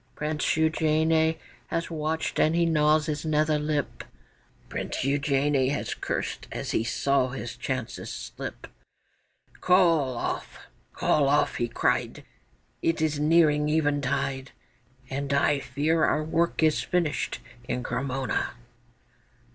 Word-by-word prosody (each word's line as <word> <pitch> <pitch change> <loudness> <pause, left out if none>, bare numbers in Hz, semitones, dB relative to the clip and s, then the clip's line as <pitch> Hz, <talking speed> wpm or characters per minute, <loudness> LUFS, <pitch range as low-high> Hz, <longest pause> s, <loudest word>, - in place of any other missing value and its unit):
Prince 150 0 -2
Eugène 160 0 +2 0.3
has 165 0 -3
watched, 160 0 -2
and 155 +2 +3
he 170 0 +3
gnaws 155 -1 +3
his 150 -2 -3
nether 155 -1 +2
lip; 150 -1 -2 0.6
Prince - - -4
Eugène 140 -1 +1
has 145 - -2
cursed - - -4
as - - -4
he - - +1
saw 130 +3 +1
his 125 -2 -6
chances 130 -3 -4
slip: - - -7 0.9
'Call 165 -9 +3
off! - - -4 0.3
Call 140 -2 +2
off!' 145 - +2
he 120 - 0
cried, 120 - -1 0.6
'It 165 0 +1
is 155 -2 0
nearing 150 -1 +4
eventide, 140 -3 0 0.6
And 140 +1 -3
I 140 0 +3
fear 150 +5 0
our 155 - +2
work 165 +1 0
is 155 -1 +3
finished 170 -4 -1 0.3
in 125 - -2
Cremona. 130 0 -2
150 Hz, 120 wpm, -27 LUFS, 140-160 Hz, 0.9 s, nearing